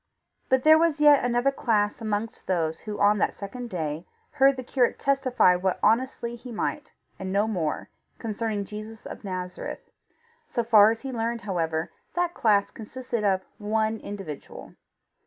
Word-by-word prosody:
But 260 -1 +3
there 315 +1 +7
was 325 -3 +2
yet 295 -1 +6
another 245 +2 +2
class 215 -4 0
amongst 215 +1 -3
those 165 -3 0
who 210 -1 -6
on 205 0 +4
that - - +1
second 240 +5 -7
day 160 -2 -4 0.2
heard 275 -1 +4
the 255 - -6
curate 245 0 +1
testify 265 -8 +3
what 185 +1 0
honestly 235 +1 +1
he 240 +1 -10
might, 220 - -3 0.3
and 190 0 -4
no 200 +3 +2
more, 175 -8 -2 0.3
concerning 220 -2 -3
Jesus 215 +2 -9
of - - -8
Nazareth. 185 -2 -6 0.6
So 235 - -1
far 215 -2 +7
as 225 0 -2
he 270 - -5
learned, 230 -1 -2
however, 165 -5 -2 0.2
that 350 -1 0
class 205 -7 +2
consisted 235 0 -5
of 190 -2 +1
one 220 +1 0
individual. 195 -8 -8
220 Hz, 155 wpm, -26 LUFS, 200-245 Hz, 0.6 s, there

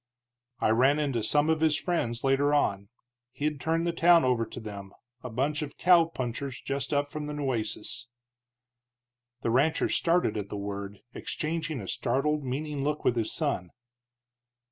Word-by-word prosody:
"I - - +2
ran 130 +6 +4
into 140 -6 0
some 145 +7 +3
of 160 -1 0
his 155 -2 +3
friends 120 -10 -1
later 140 +2 +3
on. 100 -8 0 0.4
He'd 150 -1 -2
turned 165 +1 +1
the 170 - +1
town 170 0 +6
over 120 -3 +1
to - - -8
them, 100 -3 -8 0.3
a 125 - -6
bunch 140 +6 -1
of 145 -1 -6
cowpunchers 140 -7 +2
just 140 0 -3
up 145 0 +1
from 150 +1 -5
the 150 - -4
Nueces." 120 -3 -3 1.3
The 115 - 0
rancher 145 +7 +2
started 170 -10 +2
at 100 -1 -4
the 105 - -4
word, 100 0 -5
exchanging 155 -2 -3
a 95 - -8
startled, 150 +7 0
meaning 140 +2 -3
look 150 +1 -2
with 125 - +3
his 115 -2 -1
son. 140 - -2
140 Hz, 160 wpm, -28 LUFS, 115-150 Hz, 1.3 s, town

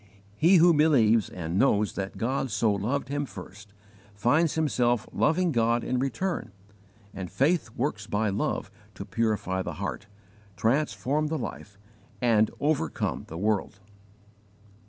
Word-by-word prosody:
He 170 - +5
who 175 0 +6
believes 120 -9 +4
and 85 +1 -3
knows 105 -6 +2
that 95 0 -5
God 130 +3 -1
so 110 0 +1
loved 120 +7 -2
him 145 0 -2
first, 100 +1 -11 0.4
finds 145 +10 +2
himself 125 -7 +1
loving 175 +2 +2
God 115 -2 +1
in 125 - -1
return, 135 - -2 0.6
and 95 -2 -6
faith 150 -1 +1
works 120 -5 -2
by 110 0 0
love 100 - -2 0.2
to - - -7
purify 105 -5 -1
the - - -4
heart, 100 +2 -5 0.5
transform 145 +5 0
the 160 +1 -2
life, 100 -6 -7 0.4
and 110 -3 +3
overcome 145 - -1
the 80 - -7
world. 105 0 -1
115 Hz, 135 wpm, -27 LUFS, 105-145 Hz, 0.6 s, who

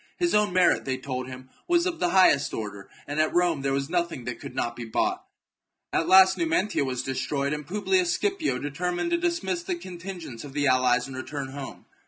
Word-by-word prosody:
His 345 -1 +1
own 210 -1 +3
merit, 180 0 +3
they 130 -1 -2
told 130 -1 -4
him, 130 0 -10 0.2
was 345 -1 +3
of 350 -2 -2
the 175 - +1
highest 175 -6 +4
order, 100 -2 -6 0.2
and 145 +2 -3
at 155 - 0
Rome 175 -5 +2
there 135 0 0
was 135 0 -1
nothing 170 -6 -2
that 125 - -5
could - - -9
not 120 0 -2
be 120 - -6
bought. 110 -1 -1 0.7
At 165 - +1
last 190 0 +7
Numantia 165 +1 +1
was 130 -2 -2
destroyed, 140 +2 -1
and 150 -1 -5
Publius 190 -2 +1
Scipio 390 -6 0
determined 175 - -2
to 340 - +3
dis 340 0 -1
miss 350 -2 -1
the 360 +1 -3
contingents 175 - -8
of 140 -2 -9
the 145 0 0
allies 130 -2 +3
and 135 - -8
return 135 +1 -5
home. 135 0 -8
155 Hz, 210 wpm, -26 LUFS, 130-190 Hz, 0.7 s, last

